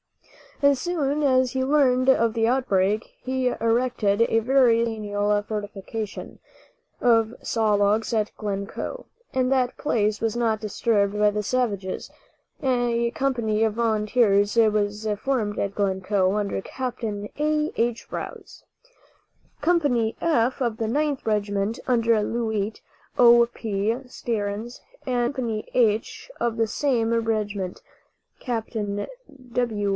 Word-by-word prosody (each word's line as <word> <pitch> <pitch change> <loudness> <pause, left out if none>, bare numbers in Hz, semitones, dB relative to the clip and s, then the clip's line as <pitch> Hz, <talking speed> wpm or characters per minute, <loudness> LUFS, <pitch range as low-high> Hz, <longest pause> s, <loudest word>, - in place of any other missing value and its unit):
As 280 -2 +5
soon 300 -3 -1
as 260 -2 +3
he 260 -1 -1
learned 260 -2 +3
of 230 -4 +4
the 225 -1 +1
outbreak 215 -4 +1
he 260 0 -1
erected 230 -3 +1
a 225 -1 +2
very 245 -1 +4
substantial 210 -2 0
fortification 210 0 -6 0.6
of 230 -2 +3
saw 220 -2 +1
logs 205 +3 +2
at 215 -1 0
Glencoe, 200 - -5 0.3
and 255 0 +1
that 255 -2 +1
place 215 -7 0
was 225 -1 -1
not 230 -2 +1
disturbed 210 -1 0
by 210 0 +4
the 210 0 -2
savages. 205 -5 -2 0.5
A 240 -2 +1
company 235 -5 0
of 220 -1 +1
volunteers 215 -2 +2
was 210 -1 +2
formed 225 -6 -1
at 200 0 -1
Glencoe, 190 -1 +1
under 205 -2 -1
Capt. 255 +3 -5
A. 205 -2 -4 0.5
H. 235 0 -1
Rouse. - - -7 1.0
Company 285 -9 +2
"F" 260 -5 +1
of 235 -3 0
the 225 - -2
Ninth 290 +3 -1
Regiment, 205 0 -1
under 230 -3 +3
Lieut. 220 -2 -2 0.4
O. 235 -1 +7
P. 215 0 -1
Stearns, 225 -1 -4 0.3
and 245 0 0
Company 230 -5 -3
"H" 225 - +1
of 235 -1 -1
the 225 0 +2
same 235 -2 0
regiment 210 -5 -2 0.6
(Capt. 235 -2 -4 0.8
W. 220 -5 0
225 Hz, 120 wpm, -24 LUFS, 210-250 Hz, 1.0 s, O